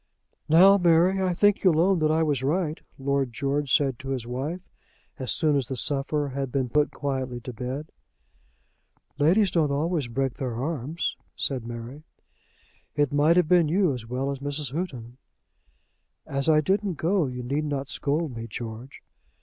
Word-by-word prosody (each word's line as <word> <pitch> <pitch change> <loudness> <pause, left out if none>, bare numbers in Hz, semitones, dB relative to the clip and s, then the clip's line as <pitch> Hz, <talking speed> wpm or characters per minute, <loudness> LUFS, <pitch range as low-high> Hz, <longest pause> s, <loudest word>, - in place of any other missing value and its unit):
"Now, 190 +5 +7
Mary, 175 +2 +4
I 185 -2 0
think 205 +2 +3
you'll 170 -5 +4
own 185 +1 +3
that 155 -1 +2
I 160 +1 +2
was 145 -5 0
right," 155 +3 -1 0.2
Lord 140 -1 0
George 140 +3 -1
said 135 -4 +2
to 135 - -7
his 130 -4 -2
wife, 140 +9 -4 0.5
as 130 - -2
soon 155 -2 +2
as 135 -4 0
the 130 - -4
sufferer 145 +3 -1
had 135 -1 -4
been 130 -2 -1
put 150 +4 +2
quietly 130 -3 -3
to 125 - -7
bed. 130 +6 -5 1.3
"Ladies 180 +6 +4
don't 160 -4 +2
always 150 0 0
break 135 +2 -1
their 125 -4 -3
arms," 150 +4 -2 0.2
said 130 -4 -3
Mary. 120 +5 -7 0.9
"It 145 -1 +1
might 150 +4 +4
have 180 -3 +4
been 175 -2 +4
you 180 -2 +2
as 120 -3 -7
well 130 +3 -2
as 140 - -5
Mrs. 145 0 -3
Houghton." 130 -8 -5 1.1
"As 140 +2 -1
I 155 -1 +5
didn't 195 +3 0
go, 170 0 +1
you 125 -1 -5
need 140 +5 -1
not 140 -2 -3
scold 145 -1 -2
me, 115 0 -6
George." 115 +3 -8
145 Hz, 170 wpm, -26 LUFS, 130-165 Hz, 1.3 s, Now